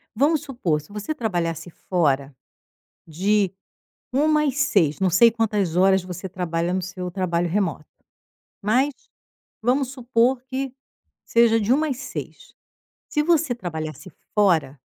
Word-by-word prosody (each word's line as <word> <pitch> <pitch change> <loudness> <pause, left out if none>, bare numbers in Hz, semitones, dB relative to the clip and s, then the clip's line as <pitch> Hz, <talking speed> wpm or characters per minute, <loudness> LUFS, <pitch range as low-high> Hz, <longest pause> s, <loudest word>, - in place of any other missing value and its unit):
Vamos 295 +5 +3
supor, 215 - -1
se 150 - -20
você 210 +9 -4
trabalhasse 175 - -2
fora, 145 -7 -1 0.7
de 195 +4 +1 0.6
1h 300 +2 +3
e 280 - +1
6h 200 - +2
não 190 - +3
sei 230 +7 +6
quantas 210 -6 0
horas 190 0 +4
você 185 +1 -7
trabalha 175 -1 -2
no 185 - -1
seu 180 0 -5
trabalho 175 -2 -1
remoto. 170 -5 -1 0.8
Mas 255 +8 +2 0.7
vamos 260 +3 +2
supor 250 0 +1
que 265 0 -4 0.5
seja 230 -1 +4
de 220 +4 +2
1h 310 +3 +1
às 270 -5 -2
6h. 275 - -8 0.6
Se 300 - +1
você 320 -5 +2
trabalhasse 160 - -6 0.2
fora 170 -9 +2
205 Hz, 135 wpm, -23 LUFS, 175-260 Hz, 0.8 s, sei